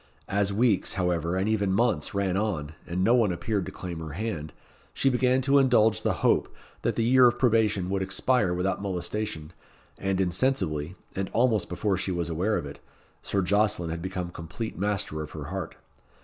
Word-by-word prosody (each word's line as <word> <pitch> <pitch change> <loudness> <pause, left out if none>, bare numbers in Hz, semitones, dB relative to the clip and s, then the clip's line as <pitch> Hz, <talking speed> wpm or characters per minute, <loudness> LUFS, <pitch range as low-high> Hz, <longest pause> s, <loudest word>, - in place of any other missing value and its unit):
As 100 0 +1
weeks, 105 -2 +2
however, 90 -2 0
and 95 +2 0
even 100 -3 +1
months, 105 -6 +1
ran 95 -2 0
on, 90 -8 -2
and 90 +2 -1
no 115 - +4
one 115 -6 +3
appeared 100 +2 -2
to - - -5
claim 85 -3 -6
her 80 -2 -6
hand, 85 -6 -4 0.4
she 135 - +3
began 125 +1 +2
to 140 +1 +5
indulge 115 -5 +4
the - - +1
hope - - +3 0.3
that - - 0
the 115 - +1
year 125 +2 +6
of 120 - +1
probation 110 -6 +2
would 95 -1 0
expire 100 +2 +1
without 90 +2 -1
molestation, 90 -3 -3 0.5
and 95 -1 -1
insensibly, 90 - 0 0.2
and 95 0 -2
almost 115 -5 +2
before 95 +2 0
she 95 - -2
was 85 -2 -2
aware 95 +7 0
of 85 - -4
it, 70 - -9 0.4
Sir 100 -1 -1
Jocelyn 100 -3 +1
had 85 +1 -4
become 90 -1 -4
complete 85 +8 -6
master 100 -5 -1
of 75 - -8
her - - -6
heart. - - -4
95 Hz, 185 wpm, -27 LUFS, 85-110 Hz, 0.5 s, year